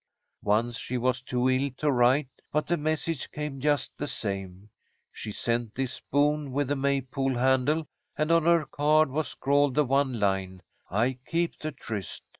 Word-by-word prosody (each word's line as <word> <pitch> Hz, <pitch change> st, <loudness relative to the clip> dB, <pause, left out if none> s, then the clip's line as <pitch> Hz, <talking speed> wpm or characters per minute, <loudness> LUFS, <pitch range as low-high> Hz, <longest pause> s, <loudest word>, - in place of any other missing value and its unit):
"Once 115 Hz, +3 st, +1 dB
she 125 Hz, -, -3 dB
was 125 Hz, +1 st, 0 dB
too 125 Hz, 0 st, 0 dB
ill 130 Hz, +2 st, +2 dB
to 150 Hz, -1 st, +1 dB
write, 130 Hz, +3 st, +4 dB, 0.2 s
but 150 Hz, +1 st, +1 dB
the 175 Hz, -, +1 dB
message 155 Hz, -1 st, -2 dB
came 150 Hz, -2 st, -5 dB
just 145 Hz, 0 st, +1 dB
the 145 Hz, -, -2 dB
same. 100 Hz, -6 st, -4 dB, 0.4 s
She 105 Hz, -, -6 dB
sent 115 Hz, +1 st, -2 dB
this 130 Hz, -1 st, -2 dB
spoon 145 Hz, 0 st, 0 dB
with 140 Hz, -1 st, 0 dB
the 145 Hz, -, +1 dB
May 140 Hz, 0 st, +1 dB
pole 135 Hz, 0 st, -2 dB
handle, 130 Hz, +5 st, +2 dB, 0.3 s
and 155 Hz, +2 st, +1 dB
on 165 Hz, -1 st, +4 dB
her 170 Hz, -2 st, +4 dB
card 150 Hz, +1 st, +3 dB
was 155 Hz, +3 st, -1 dB
scrawled 140 Hz, -1 st, +1 dB
the 150 Hz, -, +4 dB
one 135 Hz, -2 st, +1 dB
line, 95 Hz, -2 st, -1 dB, 0.3 s
'I 120 Hz, +7 st, +1 dB
keep 170 Hz, 0 st, -1 dB
the 155 Hz, -, -3 dB
tryst.' 110 Hz, -8 st, -6 dB
135 Hz, 175 wpm, -28 LUFS, 120-150 Hz, 0.4 s, write